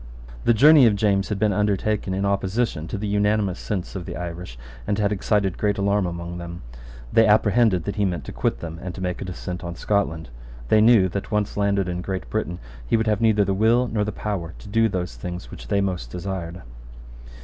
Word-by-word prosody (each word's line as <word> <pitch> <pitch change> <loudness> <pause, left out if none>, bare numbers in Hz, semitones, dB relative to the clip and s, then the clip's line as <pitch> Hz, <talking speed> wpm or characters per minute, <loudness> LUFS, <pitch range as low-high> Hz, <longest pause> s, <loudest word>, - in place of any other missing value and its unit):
The 120 - +5
journey 145 +2 +7
of 105 - +3
James 100 -2 +1
had 105 - -1
been 105 0 +2
undertaken 105 -1 0
in 100 +1 -1
opposition 100 -3 -1
to 100 - -4
the 105 - -4
unanimous 105 -2 +1
sense 95 -3 -4
of 90 -2 -5
the 85 - -5
Irish, 85 -6 -6 0.3
and 100 - 0
had 105 -1 +1
excited 100 -2 0
great 105 0 +1
alarm 100 -1 +1
among 85 0 -5
them. 85 0 -8 0.5
They 115 -1 +6
apprehended 105 -3 +3
that 100 +4 -4
he 105 - +2
meant 90 -6 -2
to - - -6
quit - - -1
them, 85 0 -6
and 90 0 -6
to - - -7
make 90 -1 -3
a - - -3
descent 90 +1 -6
on 85 0 -5
Scotland. 85 -7 -1 0.4
They 110 - +5
knew 110 -4 +6
that, 100 +2 -4
once 105 -1 -1
landed 100 -2 +1
in 90 0 -3
Great 95 0 -4
Britain, 100 -5 -2 0.3
he - - +1
would 110 - 0
have 105 -1 +1
neither 110 -3 +4
the 95 - 0
will 115 +5 +3
nor 110 -3 0
the 105 - -2
power 95 -5 -4
to - - -13
do 115 +2 +2
those 90 - -4
things 90 +7 -7
which - - -10
they 100 -1 +1
most 90 -10 -2
desired. 90 +1 -5
100 Hz, 215 wpm, -23 LUFS, 90-105 Hz, 0.5 s, journey